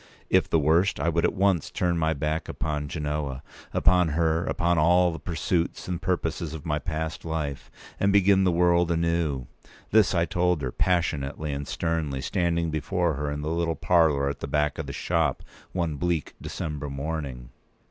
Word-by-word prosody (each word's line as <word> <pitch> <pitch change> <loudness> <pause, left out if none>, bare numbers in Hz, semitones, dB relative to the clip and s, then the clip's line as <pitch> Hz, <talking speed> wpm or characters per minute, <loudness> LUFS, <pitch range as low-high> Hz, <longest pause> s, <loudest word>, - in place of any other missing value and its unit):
If - - +3
the - - +3
worst, 80 +6 +2
I 85 - +1
would 85 0 +1
at - - 0
once 95 -4 +2
turn 90 -1 0
my 80 -1 +1
back 80 +3 -2
upon 75 -2 -3
Genoa, 75 -2 -3 0.3
upon 90 -1 +4
her, 80 0 +2
upon 85 -1 +1
all 90 +3 +4
the 80 - -6
pursuits 85 0 -2
and 90 -1 -3
purposes 85 -3 -2
of 75 - -9
my 75 -2 0
past 80 0 -4
life, 80 -4 -4 0.3
and 100 - +3
begin 100 -1 +5
the 90 - +3
world 85 0 +3
anew. 85 -5 0 0.5
This 110 -3 +4
I 85 0 +3
told 90 -3 0
her, 65 - -2
passionately 75 -4 0
and 70 0 -4
sternly, 80 -5 -2
standing 85 +2 0
before 85 +2 0
her 75 +1 -3
in 75 0 -3
the 75 +2 -2
little 85 -1 0
parlour 80 -6 +3
at 70 - -3
the - - -5
back 75 +1 0
of - - -4
the - - -4
shop, - - 0 0.3
one 85 -5 -2
bleak 85 -2 -1
December 75 -3 -4
morning. 70 -3 -4
80 Hz, 180 wpm, -26 LUFS, 75-85 Hz, 0.5 s, begin